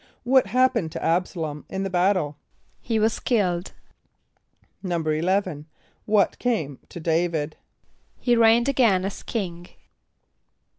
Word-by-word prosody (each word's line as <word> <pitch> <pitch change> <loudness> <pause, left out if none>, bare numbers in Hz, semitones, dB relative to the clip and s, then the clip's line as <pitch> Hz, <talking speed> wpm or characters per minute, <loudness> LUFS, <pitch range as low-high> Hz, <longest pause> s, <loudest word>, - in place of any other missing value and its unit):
= - - -42
What 260 -6 +6
happened 235 -6 +2
to - - -4
[)A]b´sa 175 +3 0
l[)o]m 150 -2 -4
in 190 0 -3
the 195 - -2
battle? 180 -5 +1 0.5
=He 230 -2 -1
was 220 +1 +1
killed.= 185 -7 0 1.1
=11.= 170 -1 -1 0.4
What 210 -3 +2
came 160 - -1
to - - -8
D[=a]´vid? 160 -2 0 0.6
=He 245 -1 +2
reigned 230 +1 +5
again 230 -9 +3
as 195 - -5
king. 175 -6 -4
185 Hz, 120 wpm, -24 LUFS, 165-225 Hz, 1.1 s, What